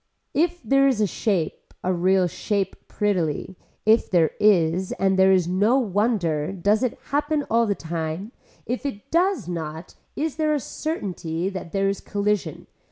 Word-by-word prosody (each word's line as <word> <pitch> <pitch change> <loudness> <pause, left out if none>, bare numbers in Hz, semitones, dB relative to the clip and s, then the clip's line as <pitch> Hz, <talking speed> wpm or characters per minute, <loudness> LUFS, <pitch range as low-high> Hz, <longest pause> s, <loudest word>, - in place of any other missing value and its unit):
If 345 +2 0
there 275 0 +4
is 260 -5 +1
a 210 - +4
shape 190 -4 -2
a 185 - +1
real 185 +1 +3
shape 200 +3 -3
prettily, 190 -3 -1 0.3
if 220 +2 +4
there 165 -4 +3
is 185 -3 +3
and 195 0 +1
there 190 0 +6
is 185 -3 +3
no 205 +8 +3
wonder 200 - 0
does 200 +3 +1
it 255 -3 -1
happen 290 0 0
all 230 0 +3
the 200 - +1
time, 165 +5 -4 0.3
if 245 +3 -3
it 260 -8 -6
does 345 - +2
not 160 -1 -5 0.2
is 315 0 -2
there 310 -1 +2
a - - 0
certainty 185 - -3
that 185 -4 -7
there 195 0 +1
is 195 0 -1
collusion. 205 0 -2
200 Hz, 165 wpm, -24 LUFS, 175-245 Hz, 0.3 s, there